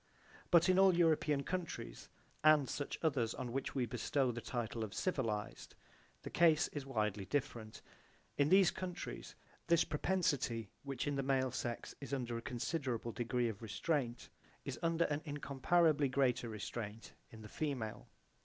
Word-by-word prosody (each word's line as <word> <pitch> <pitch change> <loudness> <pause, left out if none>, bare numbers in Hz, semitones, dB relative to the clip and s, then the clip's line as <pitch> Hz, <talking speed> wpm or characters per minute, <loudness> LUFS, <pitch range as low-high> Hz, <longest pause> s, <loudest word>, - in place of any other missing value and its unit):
But 170 -1 +6
in 185 0 +4
all 190 -2 +6
European 155 -4 +3
countries 180 0 -5 0.3
and 155 -3 +6
such 145 +2 -3
others 130 -8 +1
on 120 - -4
which 135 +3 -3
we 130 -2 +1
bestow 125 +3 0
the 120 0 -5
title 115 -2 -3
of 100 -3 -6
civilized, 115 - -2 0.5
the - - -6
case 165 -1 +4
is 140 -2 -6
widely 105 -5 -1
different. 115 -2 -3 0.5
In 145 +1 +3
these 190 -1 +6
countries 185 0 -6 0.3
this 170 -1 +5
propensity, 145 - 0
which 135 -3 -4
in 145 -1 -1
the - - +1
male 130 -1 +1
sex 120 -1 -4
is 140 0 -3
under 120 -3 -3
a 115 - -3
considerable 125 -1 -2
degree 120 +1 0
of 110 -2 -5
restraint, 120 +2 -2 0.4
is - - -4
under 165 0 +2
an 145 0 -1
incomparably 145 +1 +2
greater 125 -3 +1
restraint 110 0 -6 0.2
in 110 -1 -12
the - - -8
female. 125 -4 -3
135 Hz, 155 wpm, -36 LUFS, 115-155 Hz, 0.5 s, But